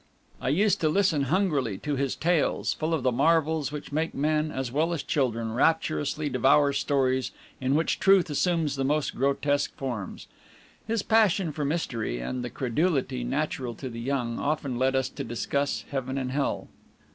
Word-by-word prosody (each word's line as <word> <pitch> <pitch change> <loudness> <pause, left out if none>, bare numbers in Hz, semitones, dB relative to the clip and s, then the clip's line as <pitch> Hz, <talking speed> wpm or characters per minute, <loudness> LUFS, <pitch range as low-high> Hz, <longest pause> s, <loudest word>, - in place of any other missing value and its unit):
I - - -1
used 195 +8 +2
to 155 - +3
listen 160 -5 +2
hungrily 140 - +1
to 145 +5 -3
his 135 -1 -1
tales, 170 -1 +1
full 155 +1 -2
of 145 - -3
the 130 - +3
marvels 155 +2 +2
which 150 0 -7
make 160 +3 -1
men, 155 +2 +1
as 130 -4 -3
well 160 +5 +1
as 165 - -3
children, 115 -5 -1
rapturously 155 +2 +1
devour 140 +2 +3
stories 130 -3 +1 0.3
in 130 +1 +1
which 160 - +1
truth 195 -2 +5
assumes 160 -2 +1
the 135 - 0
most 150 +2 0
grotesque 140 +2 0
forms. 120 -8 -5 0.6
His 225 -2 0
passion 205 -6 +3
for 150 0 -4
mystery, 125 - -2
and 125 - -4
the 120 - -4
credulity 130 -1 0
natural 130 -2 -2
to 130 +3 -6
the 115 -1 -7
young, 120 -2 -2
often 140 -4 -1
led 130 +1 +2
us 130 -1 +1
to - - -6
discuss 140 +4 -2
Heaven 135 -1 -2
and 130 -2 -2
Hell. 140 +1 -1
140 Hz, 170 wpm, -27 LUFS, 130-155 Hz, 0.6 s, truth